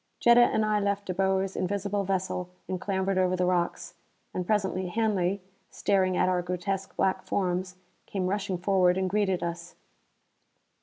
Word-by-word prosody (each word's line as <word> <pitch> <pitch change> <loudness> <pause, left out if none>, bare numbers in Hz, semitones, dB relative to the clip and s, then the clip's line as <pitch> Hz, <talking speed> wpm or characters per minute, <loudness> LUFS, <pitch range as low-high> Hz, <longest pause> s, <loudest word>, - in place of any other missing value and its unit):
Jetta 235 0 +6
and 220 -2 +3
I 210 0 +2
left 200 0 -1
De 185 - -2
Boer's 190 +1 0
invisible 200 +2 -1
vessel 185 -1 -2 0.2
and 185 -1 -3
clambered 190 -1 0
over 185 0 +2
the 180 0 +1
rocks. 180 -1 -1 0.4
And 180 -1 -3
presently 190 -3 0
Hanley, 195 -2 0 0.3
staring 185 -2 +1
at - - +3
our 180 -1 +1
grotesque 180 +2 -3
black 190 - +1
forms, 185 -1 -1 0.3
came 190 -2 -2
rushing 195 0 -1
forward 180 0 +3
and 190 0 0
greeted 190 -1 0
us. 170 0 -5
190 Hz, 155 wpm, -28 LUFS, 180-200 Hz, 0.4 s, Jetta